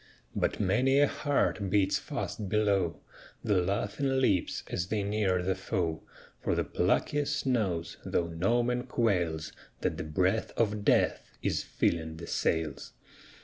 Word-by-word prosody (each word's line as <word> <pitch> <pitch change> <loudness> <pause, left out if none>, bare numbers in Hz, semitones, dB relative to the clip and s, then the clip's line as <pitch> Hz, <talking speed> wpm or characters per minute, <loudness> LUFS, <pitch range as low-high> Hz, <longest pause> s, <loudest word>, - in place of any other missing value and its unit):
But - - 0
many 125 +8 +3
a 145 - +6
heart 135 -10 0
beats 100 -1 +2
fast 100 -3 -4
below 100 -5 +1 0.4
The 100 -3 +3
laughing 105 +8 0
lips 100 -9 +1
as 85 - -2
they 105 0 -1
near 100 -3 +1
the 95 +1 +1
foe; 90 -4 -2 0.4
For - - 0
the - - +1
pluckiest 145 0 0
knows, 100 -10 0
though 85 - 0
no 95 +9 +1
man 125 +1 -1
quails, 85 -10 0 0.3
That - - -1
the - - -3
breath 90 +7 0
of 105 -2 +1
death - - +2
is - - +1
filling 80 -1 -1
the 85 - -7
sails. 80 -3 -1
100 Hz, 145 wpm, -30 LUFS, 85-115 Hz, 0.4 s, a